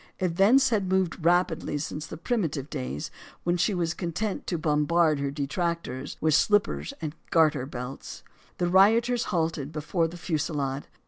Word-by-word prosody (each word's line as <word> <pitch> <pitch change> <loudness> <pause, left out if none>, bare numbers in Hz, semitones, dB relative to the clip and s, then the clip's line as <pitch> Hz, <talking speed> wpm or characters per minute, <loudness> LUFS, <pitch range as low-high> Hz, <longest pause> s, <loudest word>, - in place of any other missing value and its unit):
Events 195 +9 +4
had 200 -4 +1
moved 185 -3 0
rapidly 170 -3 +2
since 150 +1 -5
the - - -8
primitive 160 - -2
days 65 +3 -4 0.3
when 175 0 +1
she 185 +3 +1
was 170 -2 0
content 185 +5 -3
to 175 - -1
bombard 155 0 +2
her 140 0 -1
detractors 145 -1 -3
with 155 0 +2
slippers 145 - +2
and 150 -2 -3 0.2
garter 155 -5 +3
buckles. 125 0 -7 0.3
The 175 - 0
rioters 225 +6 +4
halted, 160 -4 -1
before 165 +2 -1
the 170 +2 -9
fusillade. 145 -5 -2
165 Hz, 145 wpm, -27 LUFS, 145-185 Hz, 0.3 s, Events